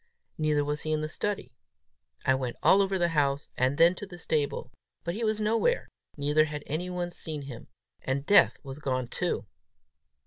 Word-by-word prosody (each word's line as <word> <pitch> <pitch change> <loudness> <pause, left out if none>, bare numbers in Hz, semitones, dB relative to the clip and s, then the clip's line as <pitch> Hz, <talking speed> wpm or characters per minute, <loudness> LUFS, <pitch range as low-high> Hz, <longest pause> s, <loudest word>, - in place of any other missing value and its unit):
Neither 150 -2 +2
was 150 +1 -2
he 155 - -3
in 155 0 +1
the 155 - -1
study. 170 - -3 0.7
I 130 - +5
went 130 -2 -2
all 200 - +6
over 195 -1 +1
the 175 -1 +2
house, 145 -3 +1
and 130 +3 +1
then 170 +2 +6
to 200 +2 -8
the 175 -2 -10
stable; 150 -6 -1 0.3
but 170 - -2
he 225 +4 -3
was 215 -1 +1
nowhere, 230 - +1 0.3
neither 150 +2 +3
had 150 -1 -5
anyone 175 +3 -3
seen 155 -4 -5
him. 130 -4 -9 0.3
And 135 +1 -2
Death 205 - +6
was 135 0 -7
gone 130 -4 -1
too! 175 -6 -1
155 Hz, 180 wpm, -28 LUFS, 140-180 Hz, 0.7 s, all